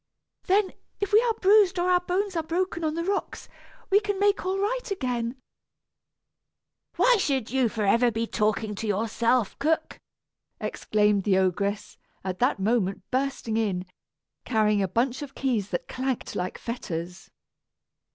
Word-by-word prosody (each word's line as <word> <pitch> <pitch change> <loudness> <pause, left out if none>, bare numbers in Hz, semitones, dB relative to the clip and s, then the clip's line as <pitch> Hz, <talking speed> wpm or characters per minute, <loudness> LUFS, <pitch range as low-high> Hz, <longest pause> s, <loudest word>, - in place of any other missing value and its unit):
Then, 390 0 +2 0.3
if 405 0 -3
we 430 - +7
are 470 -2 +1
bruised 395 -2 +4
or 355 +1 +2
our 360 - +5
bones 370 +2 -2
are 330 - +1
broken 340 +1 -2
on 310 0 0
the 335 - -2
rocks, 395 +3 -3 0.4
we 400 - +6
can 410 -1 -2
make 405 +1 +2
all 375 +1 -1
right 455 +6 -1
again 250 - -2 0.8
" - - -51
"Why - - +5
should 265 - 0
you 260 -3 +2
forever 225 +3 +2
be 230 0 -2
talking 215 -1 0
to 215 +2 -5
yourself, 225 +2 0
cook?" 315 +3 0 0.6
exclaimed 210 -2 +1
the 190 -2 +3
ogress, 200 +2 -1 0.2
at 185 -1 -4
that 250 0 +2
moment 195 -2 0
bursting 260 -4 -1
in, 195 -5 -1 0.6
carrying 215 -3 +2
a 195 - +1
bunch 240 +8 0
of 275 -1 -8
keys 230 -7 -1
that 175 - -3
clanked 260 -1 -3
like 180 +1 -3
fetters. 180 -6 -6
250 Hz, 150 wpm, -26 LUFS, -, 0.8 s, we